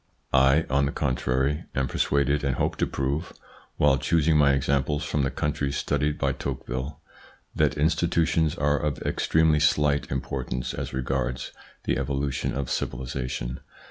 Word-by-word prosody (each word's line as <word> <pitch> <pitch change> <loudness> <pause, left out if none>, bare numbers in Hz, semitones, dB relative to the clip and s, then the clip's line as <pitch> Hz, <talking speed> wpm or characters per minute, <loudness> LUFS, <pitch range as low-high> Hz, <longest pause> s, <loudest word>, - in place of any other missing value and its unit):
I, 70 +4 +5
on 70 +1 +2
the - - -2
contrary, 65 +1 0
am 65 0 +1
persuaded 70 +1 +1
and 70 -3 0
hope - - 0
to - - +1
prove, 70 +5 -2 0.4
while 70 -2 +4
choosing 80 +3 +2
my 70 -2 +5
examples 70 +1 0
from 75 - -1
the 70 - +1
countries 75 -1 -2
studied 75 +1 0
by - - +1
Tocqueville, 65 +1 -4 0.6
that - - +2
institutions 80 +1 +2
are 75 +1 +1
of 75 -3 -1
ex - - -1
tremely 80 -2 +4
slight 75 -1 +2
importance 65 -2 -3
as - - -4
regards 65 -1 -2 0.3
the - - 0
evolution 70 -1 -1
of 70 -2 -3
civilisation. 65 -1 -3
70 Hz, 145 wpm, -26 LUFS, 65-75 Hz, 0.6 s, I